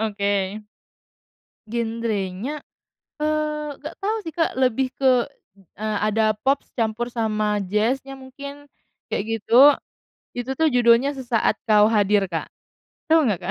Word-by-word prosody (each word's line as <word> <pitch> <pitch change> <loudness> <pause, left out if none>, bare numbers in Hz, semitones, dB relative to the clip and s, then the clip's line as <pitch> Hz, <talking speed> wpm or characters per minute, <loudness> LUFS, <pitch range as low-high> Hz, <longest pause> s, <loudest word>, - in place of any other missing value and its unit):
Oke. 205 -2 -3 1.5
Genre-nya, 225 +1 -3 0.6
eee, 305 0 -1
nggak - - -7
tau 425 +3 0
sih 325 - -6
Kak, 325 -1 +1
lebih 255 0 +1
ke, 255 -3 +3 0.6
e 215 - -4 0.2
ada 215 0 +2
pop 275 +1 +3 0.2
campur 230 +1 -1
sama 215 -3 0
jazz-nya 230 +8 -1
mungkin, 280 +2 -10 0.4
kayak - - -1 0.2
gitu. - - -12 0.9
Itu 250 +2 -3
tuh, 320 +1 +3
judulnya 245 +2 +4
"Sesaat 245 -3 0
Kau 210 0 +5
Hadir" 205 -2 +2
Kak, 165 - -2 0.6
tahu 320 -1 +5
nggak 195 - -1
Kak? 180 +1 -4
235 Hz, 125 wpm, -23 LUFS, 215-275 Hz, 1.5 s, Kau